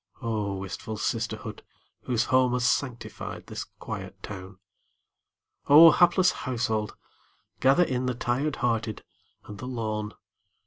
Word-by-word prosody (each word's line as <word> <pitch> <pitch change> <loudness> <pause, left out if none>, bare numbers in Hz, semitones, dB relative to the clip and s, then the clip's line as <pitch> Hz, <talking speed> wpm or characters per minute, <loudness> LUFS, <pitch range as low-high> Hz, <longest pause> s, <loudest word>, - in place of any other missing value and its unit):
Oh, 105 -4 -2
wistful 95 +3 -6
sisterhood, - - -3 0.4
whose 120 -2 +1
home 130 0 +3
Has 125 -1 +1
sanctified 120 +1 -3
this - - -5
quiet - - -8
town! 95 -1 -8 1.1
Oh, 160 +3 +10
hapless 180 +2 +4
household, 110 -4 -2 0.6
gather 135 +7 +5
in 130 -5 -1
The 125 - -1
tired 130 +5 -1
hearted 115 -3 -1 0.4
and 105 -1 -10
the 125 - -6
lone! 110 -4 -3
120 Hz, 120 wpm, -27 LUFS, 110-130 Hz, 1.1 s, Oh